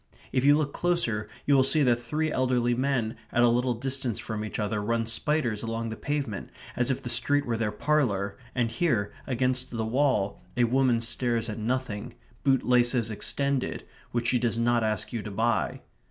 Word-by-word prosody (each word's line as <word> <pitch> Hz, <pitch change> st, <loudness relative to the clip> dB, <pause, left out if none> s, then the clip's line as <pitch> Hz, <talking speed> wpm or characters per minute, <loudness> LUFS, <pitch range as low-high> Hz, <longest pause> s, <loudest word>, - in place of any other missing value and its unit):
If 130 Hz, -, +1 dB
you 145 Hz, +1 st, +6 dB
look 145 Hz, -2 st, -1 dB
closer 120 Hz, -13 st, 0 dB, 0.2 s
you 145 Hz, -, +3 dB
will 135 Hz, -, +6 dB
see 135 Hz, +3 st, +4 dB
that 120 Hz, -3 st, +4 dB
three 155 Hz, +6 st, -1 dB
elderly 125 Hz, -2 st, +1 dB
men 125 Hz, -3 st, 0 dB
at 120 Hz, -, +3 dB
a -, -, +6 dB
little 125 Hz, +1 st, +1 dB
distance 130 Hz, -1 st, -2 dB
from 110 Hz, -1 st, -4 dB
each 110 Hz, -, -5 dB
other 105 Hz, 0 st, -1 dB
run 115 Hz, +2 st, 0 dB
spiders 115 Hz, -1 st, 0 dB
along 115 Hz, 0 st, -3 dB
the 110 Hz, -, -5 dB
pavement 140 Hz, -8 st, -3 dB, 0.3 s
as 125 Hz, +1 st, 0 dB
if 130 Hz, -, -1 dB
the -, -, -5 dB
street 140 Hz, +5 st, +3 dB
were 120 Hz, -, -1 dB
their 110 Hz, -2 st, -1 dB
parlour, 105 Hz, -6 st, 0 dB, 0.2 s
and 120 Hz, -3 st, +1 dB
here, 115 Hz, -6 st, 0 dB
against 130 Hz, 0 st, 0 dB
the 115 Hz, -2 st, -3 dB
wall, 120 Hz, -4 st, +1 dB, 0.2 s
a 120 Hz, -, +4 dB
woman 125 Hz, -1 st, +2 dB
stares 115 Hz, -1 st, 0 dB
at 105 Hz, -, -5 dB
nothing, 115 Hz, -2 st, -3 dB, 0.3 s
boot 135 Hz, -2 st, +3 dB
laces 120 Hz, -2 st, +3 dB
extended, 140 Hz, +5 st, -1 dB, 0.3 s
which 120 Hz, 0 st, -1 dB
she 125 Hz, -, +2 dB
does 115 Hz, -1 st, 0 dB
not 120 Hz, 0 st, +2 dB
ask 110 Hz, -1 st, -1 dB
you 115 Hz, -, -2 dB
to 105 Hz, -, -6 dB
buy. 115 Hz, +3 st, 0 dB
120 Hz, 190 wpm, -27 LUFS, 115-130 Hz, 0.3 s, you